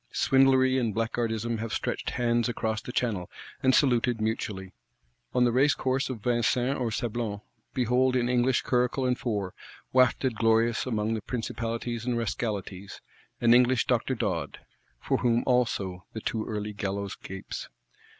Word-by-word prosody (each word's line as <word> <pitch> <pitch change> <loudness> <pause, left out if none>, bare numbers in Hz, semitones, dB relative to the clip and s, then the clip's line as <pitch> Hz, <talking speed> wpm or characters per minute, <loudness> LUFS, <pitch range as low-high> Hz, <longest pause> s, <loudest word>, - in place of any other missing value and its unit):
Swindlery 130 -1 +4
and 115 -5 -1
Blackguardism 115 0 -1
have 115 0 -4
stretched - - -2
hands 120 -1 +1
across 110 -2 -2
the - - -7
Channel, 105 -8 -1 0.3
and 130 0 +4
saluted 120 -4 +3
mutually: 105 -4 -3 0.6
on 125 - +3
the 120 - +3
racecourse 135 +1 +2
of 115 -6 -6
Vincennes 125 +2 +1
or 120 -2 0
Sablons, 110 -2 -3 0.3
behold 125 +1 +2
in 120 -1 +2
English 125 +1 +2
curricle 125 +1 +1
and 125 0 +1
four, 100 -6 -2 0.4
wafted 130 0 +3
glorious 115 +2 +2
among 110 -2 0
the 110 - -2
principalities 115 0 -3
and 120 -1 -1
rascalities, 100 -3 -4 0.4
an 120 0 +6
English 125 0 +4
Dr. 125 +1 +1
Dodd,—for - - -4
whom 120 -1 +2
also 100 -8 0
the 110 - -4
too 110 0 -2
early 105 -1 -3
gallows 100 -1 -3
gapes. 95 0 -7
120 Hz, 140 wpm, -28 LUFS, 110-125 Hz, 0.6 s, an